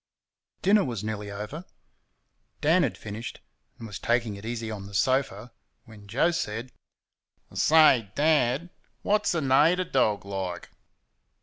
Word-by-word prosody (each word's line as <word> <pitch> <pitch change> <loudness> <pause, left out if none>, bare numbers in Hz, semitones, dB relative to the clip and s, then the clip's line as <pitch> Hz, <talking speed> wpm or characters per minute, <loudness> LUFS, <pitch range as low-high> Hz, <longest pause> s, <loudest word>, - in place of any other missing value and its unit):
Dinner 205 +2 +5
was 115 -6 -4
nearly 105 -1 -4
over; 105 - -6 1.0
Dan 165 +5 +3
had 140 -9 -1
finished, 110 +2 -7 0.4
and 115 - -9
was 105 -4 -7
taking 115 -3 0
it 100 +2 -9
easy 115 -1 -4
on 100 -2 -7
the 100 - -10
sofa, 130 +1 0 0.3
when 105 -3 -14
Joe 135 +11 +2
said: 115 -5 -4 0.8
"I - - -17
say, 140 -10 +5
Dad, 150 +1 +2 0.3
what's 210 -3 +1
a 165 - 0
nater 150 +7 +4
dog 110 - 0
like?" 95 -3 -5
120 Hz, 135 wpm, -26 LUFS, 105-155 Hz, 1.0 s, Dinner